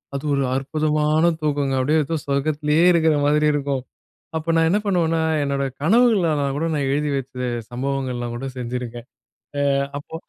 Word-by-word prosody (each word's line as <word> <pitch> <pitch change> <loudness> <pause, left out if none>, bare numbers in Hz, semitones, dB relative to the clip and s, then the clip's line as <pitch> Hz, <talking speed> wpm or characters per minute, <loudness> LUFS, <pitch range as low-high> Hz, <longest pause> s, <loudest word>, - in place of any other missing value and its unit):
அது 140 - -4
ஒரு 140 - +1
அற்புதமான 155 +3 +1
தூக்கங்க, 145 -2 0
அப்டியே 155 +4 +2
ஏதோ 165 +3 -2
சொர்க்கத்துலயே 150 +3 +1
இருக்கற 160 -2 +3
மாதிரி 150 +1 +3
இருக்கும். 140 -2 -1 0.6
அப்ப 165 +1 -2
நான் 165 0 +4
என்ன 205 - +3
பண்ணுவேன்னா 165 -4 +1 0.2
என்னோட 140 -1 -1 0.2
கனவுகளல்லாம் 170 - +3
கூட 160 +3 -1
நான் 140 -3 0
எழுதி 150 +1 0
வச்ச 125 -1 -4 0.2
சம்பவங்கள்லாம் 125 -2 -3
கூட 135 - -5
செஞ்சிருக்கேன். 120 -1 -5 0.5
அ - - +1 0.4
அப்போ 145 - -11
145 Hz, 145 wpm, -22 LUFS, 135-160 Hz, 0.6 s, நான்